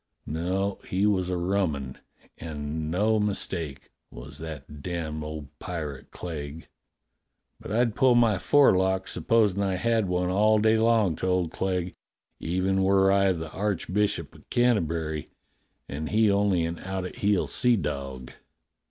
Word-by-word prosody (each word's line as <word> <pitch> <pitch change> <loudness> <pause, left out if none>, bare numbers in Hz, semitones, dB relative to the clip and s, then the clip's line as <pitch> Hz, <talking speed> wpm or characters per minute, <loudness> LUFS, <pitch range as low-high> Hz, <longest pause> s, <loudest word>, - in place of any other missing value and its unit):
No, 95 +5 -2
he 95 +2 +1
was 95 -3 +1
a 90 - 0
rummun, 85 -8 -1 0.4
and 75 0 -4
no 105 +6 +2
mistake, 85 -8 -2 0.2
was 70 +6 -10
that 75 -3 -8
damned 80 -2 -4
old 75 -1 -8
pirate 75 -6 -6
Clegg. 80 -2 -7 0.9
But - - -9
I'd 115 0 +2
pull 130 +1 +4
my 115 -5 +4
forelock, 95 -9 +3
supposing 100 +2 +2
I 95 -2 0
had 115 +1 +1
one, 90 0 0
all 105 +3 +4
day 110 +1 +3
long 110 -6 +3
to - - -2
old 90 -3 +1
Clegg, 90 -1 -2 0.5
even 95 +3 0
were 95 0 +4
I 100 -1 +4
the 80 -3 -4
Archbishop 100 0 -1
of - - -19
Canterbury 85 -10 0 0.6
and 75 +3 -5
he 110 -1 +3
only 100 -4 +2
an 85 0 -4
out 95 -1 -4
at 90 - -8
heel 100 -2 +2
seadog. 70 - 0
90 Hz, 140 wpm, -26 LUFS, 80-100 Hz, 0.9 s, pull